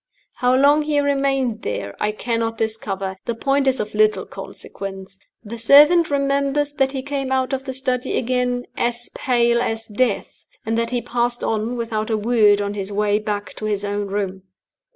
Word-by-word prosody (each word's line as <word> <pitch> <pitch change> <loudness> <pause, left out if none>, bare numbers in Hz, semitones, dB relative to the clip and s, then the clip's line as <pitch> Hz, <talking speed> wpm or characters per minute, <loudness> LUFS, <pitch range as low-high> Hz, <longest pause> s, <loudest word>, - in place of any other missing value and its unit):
How 250 0 +3
long 285 +3 +5
he 295 -1 +1
remained 275 -4 0
there 100 -1 -4
I 210 - +1
cannot 230 +1 -2
discover. 195 -4 -3
The 235 - -2
point 275 +3 +1
is 265 -1 +2
of 210 0 -4
little 215 0 +2
consequence. 195 0 -8 0.2
The 230 +1 -7
servant 295 +8 +6
remembers 280 +1 0
that 270 -1 +1
he 265 -1 -3
came 275 -1 -3
out 260 0 0
of 265 0 -2
the 265 - -3
study 255 -1 -1
again 250 0 0
'as 240 0 -1
pale 235 -2 +2
as 225 -2 -1
death,' 215 0 -1 0.2
and 225 +1 0
that 230 0 0
he 245 -1 -2
passed 240 0 -1
on 225 +2 -1
without 225 -2 -2
a 220 - +1
word 210 -2 +3
on 200 0 -3
his 200 -1 -5
way 205 0 +1
back 205 -3 -4
to 215 - -5
his 205 -1 -1
own 205 0 -2
room. 195 -1 -3
235 Hz, 180 wpm, -21 LUFS, 210-265 Hz, 0.2 s, servant